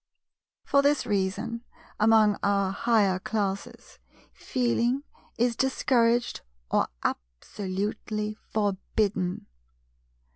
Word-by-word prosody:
For 280 Hz, -, +3 dB
this 285 Hz, 0 st, +2 dB
reason, 210 Hz, +3 st, -1 dB, 0.4 s
among 215 Hz, -1 st, +5 dB
our 200 Hz, -1 st, +2 dB
Higher 200 Hz, -3 st, +2 dB
Classes, 200 Hz, -1 st, -4 dB, 0.3 s
"Feeling" 245 Hz, +1 st, 0 dB, 0.3 s
is 235 Hz, 0 st, +2 dB
discouraged 240 Hz, -2 st, +2 dB, 0.3 s
or -, -, +3 dB, 0.2 s
absolutely 200 Hz, -, -3 dB, 0.2 s
forbidden. 200 Hz, -2 st, -1 dB
215 Hz, 75 wpm, -27 LUFS, 195-235 Hz, 0.4 s, among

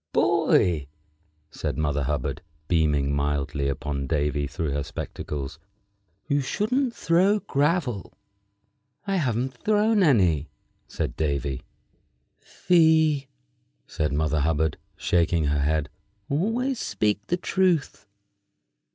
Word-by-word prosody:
"Boy," 80 Hz, -6 st, +3 dB, 0.6 s
said -, -, -4 dB
Mother 75 Hz, -2 st, 0 dB
Hubbard, 70 Hz, +2 st, -2 dB, 0.3 s
beaming 75 Hz, -4 st, +2 dB
mildly 70 Hz, 0 st, -1 dB
upon 70 Hz, 0 st, -3 dB
Davy 75 Hz, -1 st, 0 dB
through 80 Hz, +1 st, -3 dB
her 70 Hz, +1 st, -1 dB
spectacles, 75 Hz, 0 st, -6 dB, 0.7 s
"you 145 Hz, -1 st, +2 dB
shouldn't 235 Hz, -, 0 dB
throw 185 Hz, +5 st, +3 dB
gravel." 145 Hz, -, 0 dB, 0.9 s
"I 195 Hz, -1 st, 0 dB
haven't 130 Hz, -4 st, -1 dB
thrown 210 Hz, -, +2 dB
any," 90 Hz, -, +3 dB, 0.4 s
said -, -, -3 dB
Davy. 70 Hz, -3 st, -1 dB, 0.8 s
"Fie!" 160 Hz, -5 st, +3 dB, 0.6 s
said 75 Hz, -3 st, -2 dB
Mother 75 Hz, +1 st, 0 dB
Hubbard, 80 Hz, +1 st, 0 dB, 0.2 s
shaking 85 Hz, -1 st, +1 dB
her 75 Hz, 0 st, +1 dB
head; 75 Hz, 0 st, +1 dB, 0.4 s
"always 225 Hz, -, 0 dB
speak 105 Hz, 0 st, -1 dB
the 175 Hz, -, +1 dB
truth." 180 Hz, -, 0 dB
85 Hz, 100 wpm, -25 LUFS, -, 0.9 s, Boy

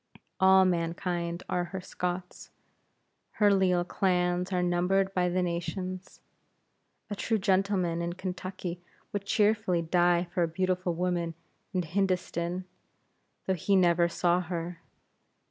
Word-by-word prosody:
All 190 Hz, 0 st, +6 dB
mankind 170 Hz, 0 st, -1 dB
are 180 Hz, -1 st, 0 dB
her 190 Hz, +2 st, -6 dB
Scots; 180 Hz, 0 st, -5 dB, 0.8 s
her 205 Hz, -1 st, +4 dB
leal 185 Hz, -2 st, +3 dB
clans 180 Hz, 0 st, 0 dB
are 180 Hz, -1 st, +1 dB
numbered 185 Hz, +2 st, +1 dB
by 180 Hz, -1 st, +2 dB
the 180 Hz, +1 st, +1 dB
nations. 180 Hz, +2 st, -4 dB, 0.9 s
A -, -, -1 dB
true 220 Hz, +2 st, 0 dB
gentleman 190 Hz, -4 st, +1 dB
in 170 Hz, 0 st, -2 dB
Kentucky 185 Hz, -1 st, -5 dB, 0.3 s
would 200 Hz, -1 st, -3 dB
cheerfully 205 Hz, -4 st, +2 dB
die 175 Hz, +1 st, +3 dB
for 180 Hz, -, 0 dB
a 170 Hz, -, +3 dB
beautiful 180 Hz, +1 st, -1 dB
woman 175 Hz, -1 st, -1 dB, 0.4 s
in 185 Hz, -2 st, 0 dB
Hindostan, 180 Hz, 0 st, -1 dB, 0.8 s
though 190 Hz, -, +1 dB
he 190 Hz, +3 st, +1 dB
never 175 Hz, -2 st, +4 dB
saw 175 Hz, +1 st, +2 dB
her. 170 Hz, -1 st, -5 dB
180 Hz, 125 wpm, -29 LUFS, 175-190 Hz, 0.9 s, All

